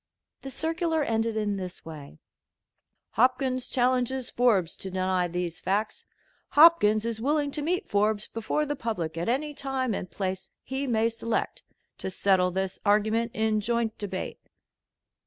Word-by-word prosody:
The 270 - -7
circular 325 +2 0
ended 225 -2 0
in 205 -2 0
this 185 -2 -7
way: 150 - -10 0.9
"Hopkins 255 +2 +1
challenges 255 0 +1
Forbes 210 -9 +2
to 190 - -5
deny 185 -1 0
these 175 -1 -3
facts. 210 +3 -2 0.5
Hopkins 260 -9 +6
is 230 -1 -3
willing 290 +2 +1
to 300 - -3
meet 360 +7 -1
Forbes 210 +1 +1
before 225 +7 -2
the 290 0 -2
public 215 - -3
at 170 +5 -2
any 295 +5 0
time 265 -4 -2
and 185 - -4
place 190 -1 -4
he 265 +2 -3
may 225 -2 +2
select, 230 0 -2 0.4
to - - -3
settle 185 -1 +2
this 190 +1 -3
argument 215 +3 +2
in 220 -1 +1
joint 230 0 0
debate." 190 -3 -4
225 Hz, 145 wpm, -27 LUFS, 190-260 Hz, 0.9 s, Hopkins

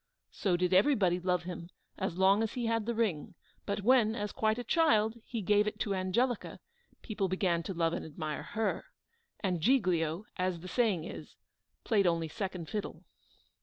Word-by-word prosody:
So 180 -3 0
did 180 +1 +1
everybody 190 -4 +4
love 180 -1 0
him 175 -1 -7 0.3
as 190 -3 -2
long 195 +3 +4
as 225 - -1
he 245 -2 -2
had 225 -1 0
the 235 - -1
ring; 205 -10 -1 0.3
but 200 0 -2
then, 235 -3 +4
as 210 -2 -3
quite 220 0 +1
a 245 - -3
child, 230 -6 +2
he 230 -4 -4
gave 210 +2 +3
it 210 0 -4
to 200 - 0
Angelica, 200 +6 -1 0.4
people 205 -3 -2
began 180 -2 +1
to 190 - -5
love 165 -1 +1
and - - -3
admire 155 -1 -5
her; 220 0 -2 0.6
and 180 -5 -1
Giglio, 180 - +2
as 180 -2 -1
the 185 - -8
saying 205 -6 +1
is, - - -9 0.5
played 205 -5 +2
only 165 -1 +1
second 185 -3 -4
fiddle. 210 -2 -5
195 Hz, 175 wpm, -31 LUFS, 175-220 Hz, 0.6 s, everybody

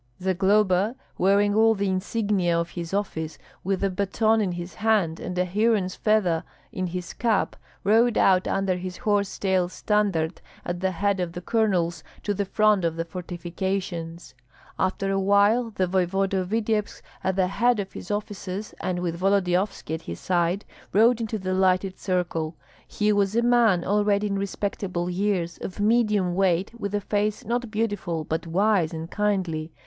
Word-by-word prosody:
Zagloba, 190 +3 +2 0.2
wearing 200 +2 +3
all 225 +1 +4
the 200 0 -1
insignia 190 -2 0
of 170 0 -2
his 170 -2 -6
office, 180 -6 -3 0.3
with 195 +1 -1
a 195 - +3
baton 215 +3 +1
in 190 -4 -1
his 175 +1 -6
hand 210 -7 +1
and 180 -1 -5
a 180 - +2
heron's 200 0 +1
feather 195 -7 +1 0.3
in 185 0 -2
his 180 0 -5
cap, 225 -4 0 0.3
rode 225 +4 +4
out 185 -1 +4
under 195 -2 0
his 185 0 -6
horse 205 -2 0
tail 185 -2 +1
standard, 190 -5 0 0.2
at 175 0 -3
the 190 +1 +1
head 195 +2 0
of 175 -2 -2
the 175 - -5
colonels, 180 -6 0 0.2
to 205 - 0
the 200 0 -1
front 210 -1 +3
of 165 -1 0
the 165 0 -3
fortifications. 175 -1 -4 0.5
After 195 +1 0
a 195 - +1
while 205 +5 +3
the 190 -4 0
voevoda 190 +1 +1
of 180 -1 -3
Vityebsk 215 -1 -1 0.2
at 190 -1 0
the 190 -1 +3
head 235 +3 +2
of 195 -1 -4
his - - -9
officers, 205 -1 -4
and 180 -1 -2
with 170 -1 -3
Volodyovski 190 -2 +1
at 160 - -3
his 85 - -7
side, 175 +2 0 0.3
rode 230 +3 +4
into 220 -1 -2
the 185 -2 -2
lighted 185 0 +1
circle. 175 -4 -1 0.3
He 210 0 +1
was 200 0 +1
a 235 - +3
man 235 -7 +4
already 205 +1 +2
in 200 -1 -1
respectable 195 -3 -3
years, 180 -3 -1
of 190 - -7
medium 210 -4 +2
weight, 185 0 +1
with 205 -3 -3
a 205 - 0
face 210 +3 -1
not 240 +1 -1
beautiful, 205 -7 -2
but 160 +2 -3
wise 185 -1 +2
and 160 0 -5
kindly. 185 -7 -1
195 Hz, 170 wpm, -25 LUFS, 180-210 Hz, 0.5 s, all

